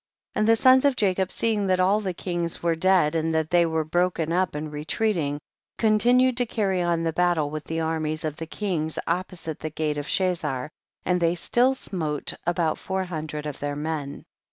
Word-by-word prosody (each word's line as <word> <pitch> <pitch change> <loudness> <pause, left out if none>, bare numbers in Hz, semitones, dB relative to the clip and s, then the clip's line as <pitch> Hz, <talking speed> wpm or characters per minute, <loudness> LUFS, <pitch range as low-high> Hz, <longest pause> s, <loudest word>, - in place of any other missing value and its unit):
7. - - -2
And 215 - +2
the 225 - +7
sons 260 +3 +5
of 280 -2 +3
Jacob 190 -4 +1
seeing 215 -3 0
that 185 -1 +2
all 195 +4 +3
the 190 -3 -2
kings 175 -2 -3
were 170 -1 +2
dead 170 -2 +3
and 160 0 0
that 160 -1 0
they 175 -1 +4
were 160 -1 0
broken 170 0 0
up 180 -3 0
and 150 0 -4
retreating, 150 0 -1 0.4
continued 240 +3 +3
to 245 -1 +1
carry 195 -5 0
on 170 -1 0
the 165 -1 -1
battle 170 -4 +1
with 155 -1 -5
the 165 0 -2
armies 155 -1 -1
of 155 -1 -3
the 160 - -6
kings 165 -5 -2
opposite 175 -2 -3
the 155 - -4
gate 150 -1 -2
of 145 - -6
Chazar, 150 -8 0 0.4
and 180 0 +2
they 170 +1 +2
still 245 +9 +2
smote 155 - -3
about 170 -2 0
four 190 0 -2
hundred 155 -4 -5
of 150 -2 -5
their 145 0 -3
men. 150 -2 -4
170 Hz, 200 wpm, -25 LUFS, 155-190 Hz, 0.4 s, the